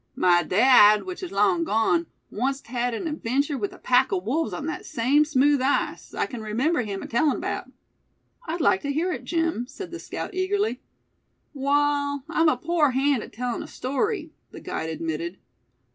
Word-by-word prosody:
My 175 Hz, -1 st, +4 dB
dad, 210 Hz, +3 st, +6 dB
which 370 Hz, 0 st, -7 dB
is 365 Hz, -, -6 dB
long 195 Hz, -4 st, +2 dB
gone, 225 Hz, -, +1 dB, 0.3 s
onct 270 Hz, +5 st, -1 dB
had 245 Hz, 0 st, -2 dB
an 285 Hz, -, -5 dB
adventure 280 Hz, -1 st, -1 dB
with 210 Hz, -6 st, -3 dB
a -, -, -13 dB
pack 255 Hz, +1 st, +2 dB
o' 190 Hz, -, +1 dB
wolves 255 Hz, -, -1 dB
on 295 Hz, -, -5 dB
thet 325 Hz, -, -4 dB
same 280 Hz, +2 st, +2 dB
smooth 290 Hz, -1 st, +3 dB
ice, 270 Hz, +2 st, -1 dB
I -, -, 0 dB
kin 245 Hz, -4 st, -7 dB
remember 250 Hz, +9 st, 0 dB
him 200 Hz, -4 st, -5 dB
tellin' 275 Hz, +5 st, +1 dB
'bout." -, -, -4 dB, 0.8 s
"I'd 330 Hz, +2 st, -2 dB
like 380 Hz, -, +3 dB
to 285 Hz, -, -2 dB
hear 330 Hz, +6 st, 0 dB
it, -, -, -7 dB
Jim," 330 Hz, -8 st, -1 dB
said 380 Hz, +6 st, -9 dB
the 345 Hz, -, -6 dB
scout, -, -, -6 dB
eagerly. 375 Hz, -, -1 dB, 0.7 s
"Wall, 285 Hz, 0 st, +1 dB
I'm 325 Hz, 0 st, +3 dB
a 260 Hz, -, +1 dB
pore 315 Hz, +1 st, +2 dB
hand 270 Hz, -1 st, +2 dB
at -, -, -10 dB
tellin' 245 Hz, 0 st, -3 dB
a -, -, -8 dB
story," 315 Hz, -, -2 dB, 0.2 s
the -, -, -10 dB
guide 160 Hz, -, -4 dB
admitted. 165 Hz, +2 st, -4 dB
275 Hz, 180 wpm, -25 LUFS, 230-315 Hz, 0.8 s, dad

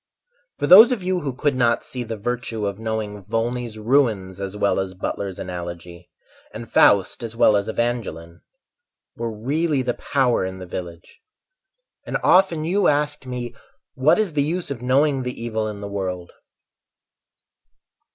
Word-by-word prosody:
For -, -, -1 dB
those 220 Hz, +7 st, +9 dB
of 230 Hz, -7 st, -2 dB
you 185 Hz, 0 st, 0 dB
who 145 Hz, -5 st, -3 dB
could 135 Hz, +2 st, -1 dB
not 120 Hz, -2 st, +2 dB
see 125 Hz, -, -5 dB
the 115 Hz, -2 st, -5 dB
virtue 115 Hz, -1 st, -3 dB
Of 100 Hz, 0 st, -3 dB
knowing 110 Hz, -2 st, -4 dB
Volney's 115 Hz, +2 st, -3 dB
"Ruins" 110 Hz, -6 st, +1 dB
as 100 Hz, +1 st, -5 dB
well 100 Hz, -1 st, +1 dB
as 95 Hz, -1 st, -4 dB
Butler's 95 Hz, 0 st, -4 dB
"Analogy" 85 Hz, -1 st, -7 dB, 0.5 s
And 115 Hz, +1 st, -7 dB
"Faust" 100 Hz, -1 st, +3 dB
as 115 Hz, -1 st, -6 dB
well 110 Hz, -2 st, +5 dB
as 100 Hz, 0 st, 0 dB
"Evangeline," 110 Hz, -9 st, -3 dB, 0.7 s
Were 115 Hz, 0 st, -3 dB
really 140 Hz, +6 st, -1 dB
the 125 Hz, -1 st, -1 dB
power 130 Hz, -5 st, +1 dB
in 95 Hz, 0 st, -4 dB
the 95 Hz, -, -8 dB
village, 85 Hz, -1 st, -8 dB, 0.8 s
And -, -, -2 dB
often 180 Hz, -4 st, +4 dB
you 195 Hz, +5 st, +2 dB
asked 150 Hz, -2 st, 0 dB
me 125 Hz, -1 st, -5 dB, 0.4 s
"What 135 Hz, +4 st, +3 dB
is 210 Hz, -6 st, 0 dB
the 145 Hz, -, +1 dB
use 165 Hz, +2 st, -2 dB
of 125 Hz, -4 st, -5 dB
knowing 135 Hz, +2 st, +2 dB
the 125 Hz, 0 st, -5 dB
evil 110 Hz, -2 st, -2 dB
in 105 Hz, -1 st, -6 dB
the 100 Hz, -, -5 dB
world?" 95 Hz, -3 st, -4 dB
115 Hz, 160 wpm, -22 LUFS, 100-135 Hz, 0.8 s, those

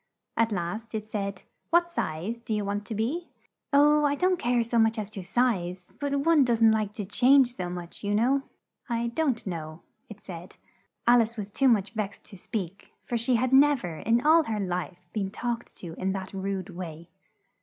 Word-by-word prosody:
At 230 Hz, 0 st, +2 dB
last 210 Hz, +5 st, -3 dB
it 215 Hz, 0 st, -4 dB
said, 200 Hz, -3 st, -4 dB, 0.3 s
"What 345 Hz, +1 st, +3 dB
size 185 Hz, -, -3 dB
do 230 Hz, -2 st, -3 dB
you 210 Hz, -1 st, -1 dB
want 205 Hz, +1 st, -2 dB
to 225 Hz, -, -4 dB
be?" 275 Hz, +12 st, -2 dB, 0.4 s
"Oh, 295 Hz, +1 st, +5 dB
I 285 Hz, -1 st, +2 dB
don't 365 Hz, +3 st, +1 dB
care 240 Hz, 0 st, +2 dB
so 235 Hz, 0 st, 0 dB
much 225 Hz, +1 st, +3 dB
as 210 Hz, -1 st, -4 dB
to 195 Hz, -3 st, -7 dB
size, 180 Hz, -4 st, -1 dB
but 280 Hz, -1 st, 0 dB
one 330 Hz, -4 st, +6 dB
does'nt 230 Hz, -3 st, +4 dB
like 215 Hz, -2 st, -1 dB
to 210 Hz, -2 st, -5 dB
change 250 Hz, +4 st, +4 dB
so 180 Hz, -4 st, -4 dB
much, 175 Hz, +1 st, -8 dB
you 205 Hz, 0 st, 0 dB
know." 255 Hz, +6 st, +3 dB, 0.5 s
"I 235 Hz, 0 st, 0 dB
don't 260 Hz, -2 st, 0 dB
know," 160 Hz, -3 st, -6 dB, 0.3 s
it 215 Hz, -1 st, -10 dB
said. 175 Hz, -2 st, -10 dB, 0.5 s
Al 240 Hz, 0 st, +6 dB
ice 230 Hz, +1 st, -3 dB
was 205 Hz, -1 st, -5 dB
too 270 Hz, +5 st, +2 dB
much 215 Hz, -5 st, +3 dB
vexed 215 Hz, -3 st, -4 dB
to -, -, -10 dB
speak, 195 Hz, -2 st, -5 dB
for 240 Hz, -, -3 dB
she 235 Hz, +2 st, +2 dB
had 255 Hz, +3 st, +1 dB
nev 280 Hz, -2 st, +5 dB
er, 170 Hz, -3 st, -5 dB
in 235 Hz, -, +1 dB
all 320 Hz, +1 st, +6 dB
her 220 Hz, -2 st, -2 dB
life, 180 Hz, -1 st, -4 dB
been 200 Hz, -3 st, -1 dB
talked 240 Hz, +3 st, -4 dB
to 170 Hz, -3 st, -8 dB
in 190 Hz, 0 st, 0 dB
that 190 Hz, 0 st, -6 dB
rude 195 Hz, 0 st, -3 dB
way. 170 Hz, -2 st, -8 dB
220 Hz, 200 wpm, -27 LUFS, 190-245 Hz, 0.5 s, one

